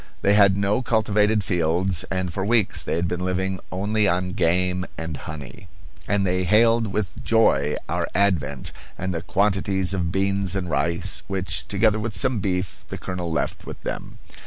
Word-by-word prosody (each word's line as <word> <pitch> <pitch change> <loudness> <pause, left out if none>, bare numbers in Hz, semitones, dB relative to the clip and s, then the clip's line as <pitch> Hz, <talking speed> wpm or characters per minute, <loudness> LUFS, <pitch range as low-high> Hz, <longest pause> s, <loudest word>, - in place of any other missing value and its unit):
They 100 - +4
had 100 -2 +5
no 100 +4 +1
cultivated 105 -2 +2
fields, 90 +1 +1
and 95 -2 -2
for 95 - -2
weeks 110 0 +2
they - - -1
had 85 +1 0
been 90 0 -3
living 95 +1 -1
only 105 +3 +1
on 90 0 0
game 90 +2 +1
and 80 -1 -4
honey; 75 -1 -8 0.4
and 100 -1 +1
they 90 0 +1
hailed 115 +4 +4
with 100 -1 -3
joy 75 -11 +3
our - - -1
advent 75 -9 0 0.3
and 95 0 -3
the 80 - -3
quantities 95 0 +1
of 85 -3 -1
beans 95 0 +1
and 90 -3 -3
rice 85 +6 0
which, 90 -5 -2
together 105 +3 +2
with 110 -2 -2
some 115 +5 +2
beef, 90 -1 -2
the - - -6
colonel 90 -2 -4
left 80 - -2
with - - -7
them. - - -6
95 Hz, 170 wpm, -23 LUFS, 90-100 Hz, 0.4 s, had